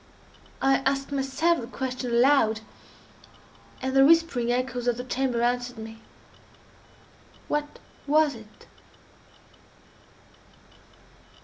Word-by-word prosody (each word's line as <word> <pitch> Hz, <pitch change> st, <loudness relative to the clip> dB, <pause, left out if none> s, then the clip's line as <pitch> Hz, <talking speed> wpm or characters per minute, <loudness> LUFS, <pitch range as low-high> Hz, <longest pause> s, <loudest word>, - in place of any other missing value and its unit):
I 270 Hz, 0 st, +4 dB
asked 275 Hz, +1 st, -1 dB
myself 280 Hz, +4 st, 0 dB
the 230 Hz, -, -7 dB
question 255 Hz, 0 st, -4 dB
aloud, 235 Hz, -2 st, +3 dB, 1.2 s
and 265 Hz, 0 st, -2 dB
the 270 Hz, -, +7 dB
whispering 305 Hz, -6 st, +3 dB
echoes 245 Hz, 0 st, -2 dB
of 240 Hz, -1 st, +1 dB
the 250 Hz, -, -5 dB
chamber 255 Hz, -2 st, -1 dB
answered 245 Hz, 0 st, -1 dB
me,—"_What 225 Hz, +6 st, -10 dB, 0.4 s
was 300 Hz, 0 st, +3 dB
it? 220 Hz, -3 st, -15 dB
255 Hz, 90 wpm, -26 LUFS, 240-275 Hz, 1.2 s, the